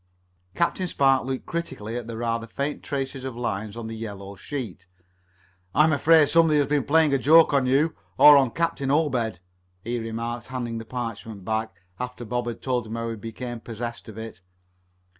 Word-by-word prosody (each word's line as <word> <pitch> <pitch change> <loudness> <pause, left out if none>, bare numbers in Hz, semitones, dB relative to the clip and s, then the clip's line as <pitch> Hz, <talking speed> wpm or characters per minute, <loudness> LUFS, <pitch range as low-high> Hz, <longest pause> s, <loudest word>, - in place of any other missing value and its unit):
Captain 180 +2 0
Spark 135 -5 +3
looked 130 -1 -3
critically 135 -10 -4
at 120 -2 -4
the 115 -1 -6
rather 115 0 -2
faint 140 +5 -3
tracing 135 -1 -4
of 130 -2 -5
lines 110 -2 -3
on 115 - -5
the 115 0 -5
yellow 100 -3 -7
sheet. 100 - -6 0.9
"I'm 155 +1 +5
afraid 155 +1 +5
somebody 165 -2 +4
has 145 - +3
been 145 -1 +1
playing 155 -1 +4
a 135 - +3
joke 155 +3 +6
on 135 -2 +3
you, 145 +5 +2 0.2
or 150 0 +10
on 135 -3 +5
Captain 165 -1 -1
Obed," 125 - +1 0.4
he 120 +1 -2
remarked, 115 +1 -4
handing 120 -3 -4
the 115 - -8
parchment 115 -4 -6
back, 110 +1 -2 0.2
after 125 -1 -5
Bob 120 +2 -2
had 115 -1 -5
told 125 -3 -1
him 110 - -5
how 115 0 -3
he - - -4
became 115 +2 -6
possessed 115 0 -6
of 110 - -10
it. 110 -3 -8
120 Hz, 180 wpm, -25 LUFS, 115-140 Hz, 0.9 s, or